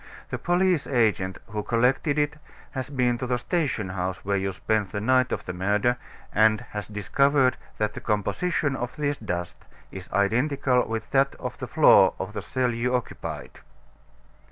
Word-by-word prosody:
The - - -3
police 175 -3 +2
agent 105 -7 +1
who 105 0 -4
collected 125 +7 +1
it 150 0 0 0.3
has 130 0 -4
been 125 -4 +1
to 125 - -3
the 125 0 +1
station 125 - -1
house 95 0 -4
where 100 0 +1
you 95 0 0
spent 105 +1 -1
the 105 - -2
night 130 +3 +2
of - - -3
the 90 - -4
murder, 105 +6 +1 0.4
and 110 +1 +4
has 105 -1 -5
discovered 130 +6 +2 0.2
that 105 0 0
the - - -7
composition 140 - 0
of 125 -2 -4
this 145 -1 -1
dust 90 -6 -5 0.3
is 95 -1 -9
identical 125 +6 +2
with 110 0 -4
that 135 0 +3
of - - -6
the - - -4
floor - - +6
of 95 +2 -5
the - - -4
cell 125 -2 0
you 125 +2 0
occupied." 125 - -5
120 Hz, 170 wpm, -26 LUFS, 105-135 Hz, 0.4 s, floor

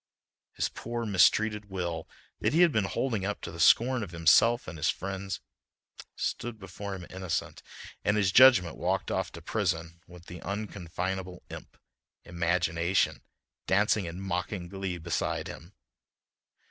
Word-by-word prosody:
His - - 0
poor, 120 0 -5
mistreated 105 +1 +3
will 85 -4 -3 0.3
that - - +1
he 165 - +4
had 175 -2 +6
been 110 -7 +1
holding 110 -1 -1
up 105 +1 -2
to - - -6
the - - -10
scorn 125 +1 +5
of 100 - -5
himself 85 +8 +4
and 80 0 -7
his 75 - +2
friends, 95 +1 -4 0.7
stood 120 -1 -3
before 100 0 -7
him 90 -2 -8
innocent, 95 -3 -3 0.4
and 105 +2 +2
his 100 -3 +2
judgment 115 -8 +6
walked 95 +2 -1
off 95 -2 -1
to 85 - -10
prison 85 -4 -2
with 90 -1 -14
the 90 0 -9
unconfinable 95 -2 -4
imp, - - -10 0.5
imagination, 85 +1 +1 0.5
dancing 100 0 +3
in 85 +2 -6
mocking 90 -1 -3
glee 95 -2 -4
beside 85 -1 -2
him. 85 +8 -10
95 Hz, 145 wpm, -29 LUFS, 85-105 Hz, 0.7 s, had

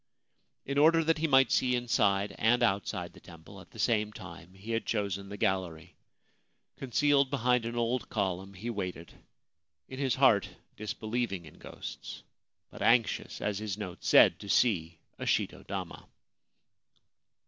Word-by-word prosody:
In 140 +1 -1
order 165 +2 +5
that 160 0 +1
he 160 - +1
might 135 -3 +4
see 125 -1 +2
inside 105 -5 +1
and 120 +3 +3
outside 100 0 -1
the - - -15
temple 85 -2 -13
at - - -17
the - - -16
same 105 -2 +1
time, 90 -6 -11
he 100 +4 -8
had 115 0 0
chosen 100 -2 -2
the 100 - -7
gallery. 90 -5 -2 0.8
Concealed 140 +2 +2
behind 125 -3 +1
an 115 +1 -4
old 120 +1 -1
column, 95 -2 -3
he 115 +6 -5
waited, 90 -5 -6 0.7
in 130 - -8
his 135 -3 +1
heart 125 -7 +4 0.3
disbelieving 110 -3 -3
in 80 - -15
ghosts, - - -9 0.5
but - - -11
anxious, 115 0 +1
as 105 -1 -2
his 105 -2 -4
notes 95 -4 -7
said, - - +6
to 100 - -10
see 85 -8 +2 0.2
a - - -4
shito - - -1
dama. - - -6
110 Hz, 150 wpm, -30 LUFS, 95-125 Hz, 0.8 s, said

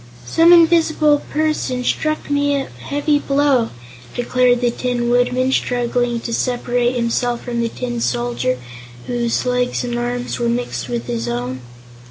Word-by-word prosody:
"Some 330 - +4
invisible 320 -3 +5
person 300 -5 -1
struck 310 +4 -1
me 285 0 +2
a 275 -1 -1
heavy 290 +1 0
blow," 275 -5 +2 0.5
declared 245 0 +2
the 240 -1 +1
Tin 240 0 -1
Woodman, 250 +1 +2
struggling 245 -1 0
to 235 - -4
separate 245 0 0
himself 240 0 -1
from 240 -2 -2
the 230 - 0
Tin 120 - -4
Soldier, 120 +1 -1 0.5
whose 240 -1 -1
legs 250 0 0
and 240 -1 -2
arms 245 +1 -3
were 235 -1 +1
mixed 235 - -3
with 120 -1 -3
his 120 -1 -3
own. 125 +2 -3
245 Hz, 145 wpm, -19 LUFS, 235-265 Hz, 0.5 s, invisible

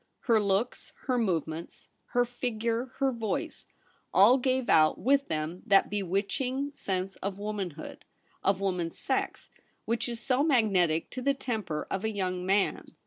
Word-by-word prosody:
Her 225 -3 +3
looks, 200 +4 -1
her 255 -2 +1
movements, 165 -6 -3 0.2
her 245 0 +1
figure, 235 -1 -2
her 270 -1 +2
voice, 225 -4 -3 0.4
all 225 +8 +6
gave 255 0 0
out 155 -1 +5
with 275 +2 +2
them 160 +3 -3
that 195 -2 +4
bewitching 210 - -1
sense 190 -3 -3
of 195 0 -4
womanhood, 200 -6 -5 0.4
of 195 -1 +2
woman's 180 -4 -1
sex, - - -2 0.3
which 230 +2 -1
is 235 -1 -4
so 255 +2 +1
magnetic 195 - +2
to 255 - -5
the 275 +2 +2
temper 220 - -3
of 195 +1 -2
a 220 - +1
young 185 -4 -2
man. 195 +1 0
210 Hz, 145 wpm, -29 LUFS, 185-245 Hz, 0.4 s, all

